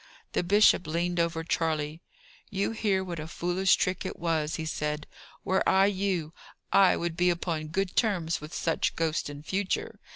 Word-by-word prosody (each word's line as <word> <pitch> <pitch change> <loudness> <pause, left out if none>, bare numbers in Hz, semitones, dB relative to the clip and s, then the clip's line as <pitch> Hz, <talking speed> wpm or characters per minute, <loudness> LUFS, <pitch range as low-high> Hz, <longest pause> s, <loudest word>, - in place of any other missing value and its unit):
The - - +2
bishop 190 -1 +4
leaned 170 +2 -1
over 165 -1 0
Charley. 160 -1 -1 0.5
"You 200 -1 -1
hear 205 -4 0
what 175 -3 -5
a 155 - -5
foolish 180 +3 +2
trick 185 0 -1
it - - -5
was," 160 -2 -1
he 160 - -4
said. 150 -1 -2 0.4
"Were 190 +1 +1
I 190 +1 +5
you, 190 -5 -1 0.4
I 195 -2 +6
would 170 -1 -2
be 180 +1 +3
upon 165 -2 -2
good 190 +3 -2
terms 175 -9 +1
with 150 +1 -9
such 165 -1 0
ghosts 160 -2 -1
in 145 0 -9
future. 190 +3 -2
170 Hz, 170 wpm, -28 LUFS, 160-190 Hz, 0.5 s, I